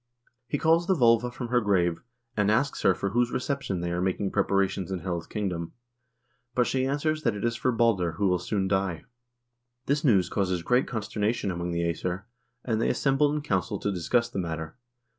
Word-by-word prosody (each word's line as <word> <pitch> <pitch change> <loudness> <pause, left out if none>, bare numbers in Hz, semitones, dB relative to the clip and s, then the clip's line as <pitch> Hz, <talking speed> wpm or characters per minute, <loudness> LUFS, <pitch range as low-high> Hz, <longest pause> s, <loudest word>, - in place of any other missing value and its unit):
He 145 - -1
calls 165 +3 +3
the 190 - +3
volva 120 -3 +4
from 120 0 -6
her 125 0 +3
grave, 90 -5 +1 0.3
and 105 -1 +2
asks 135 +7 +1
her 95 - +4
for 100 - -2
whose 120 +2 +2
reception 130 -9 -2
they 85 0 -2
are 90 +1 -1
making 95 +1 -1
preparations 95 -2 +1
in 95 -2 -3
Hel's 85 -3 -3
kingdom, 90 -6 -3 0.8
and 125 - +4
she 130 +1 0
answers 155 +3 0
that 115 -7 +1
it 105 - -3
is 115 0 0
for 130 - +1
Balder, 110 -8 +2
who 100 +4 0
will 90 -1 +2
soon 95 +1 -1
die. 95 -3 -1 0.8
This 145 +2 0
news 100 - +4
causes 90 -3 -1
great 125 +7 +2
consternation 105 -2 -1
among 85 0 -3
the 85 0 -1
iEsir, 90 +3 -2 0.4
and 115 -2 0
they - - +2
assemble 145 +1 +2
in 150 0 -2
council 100 - -1
to 100 - -2
discuss 115 +6 +1
the 100 - -5
matter. 80 -2 -4
100 Hz, 195 wpm, -27 LUFS, 90-125 Hz, 0.8 s, volva